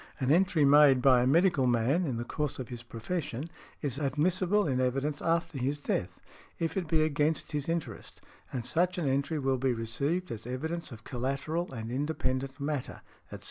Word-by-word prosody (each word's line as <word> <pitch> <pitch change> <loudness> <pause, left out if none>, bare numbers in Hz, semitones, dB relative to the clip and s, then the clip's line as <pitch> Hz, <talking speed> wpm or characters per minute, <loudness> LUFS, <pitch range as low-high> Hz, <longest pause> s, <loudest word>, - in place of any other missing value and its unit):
An 130 0 +1
entry 170 -3 +4
made 140 -2 +7
by 125 -1 +5
a 125 - +2
medical 160 -2 +4
man, 125 +9 +2
in 125 -4 -2
the 120 - -2
course 150 +3 -3
of 130 - -6
his 120 -2 -7
profession, 130 +5 -4 0.3
is 140 -1 -1
admissible 180 +7 +1
in 130 -2 +1
evidence 135 +3 -1
after 165 -3 0
his 135 +4 0
death, 90 -10 -3 0.4
if 165 -1 -2
it 185 -4 -1
be 155 0 +3
against 155 +1 0
his 145 +1 -2
interest; 165 -1 -4 0.3
and 125 -3 -4
such 180 +5 +1
an 165 -5 -1
entry 140 +4 0
will 135 -2 0
be 130 0 +1
received 140 +11 -2
as 115 0 -6
evidence 160 +6 -4
of 110 -2 -10
collateral 140 +8 -2
and 115 -2 -6
independent 135 -1 -2
matter, 140 -2 -3 0.2
etc. - - -9
140 Hz, 180 wpm, -30 LUFS, 130-160 Hz, 0.4 s, made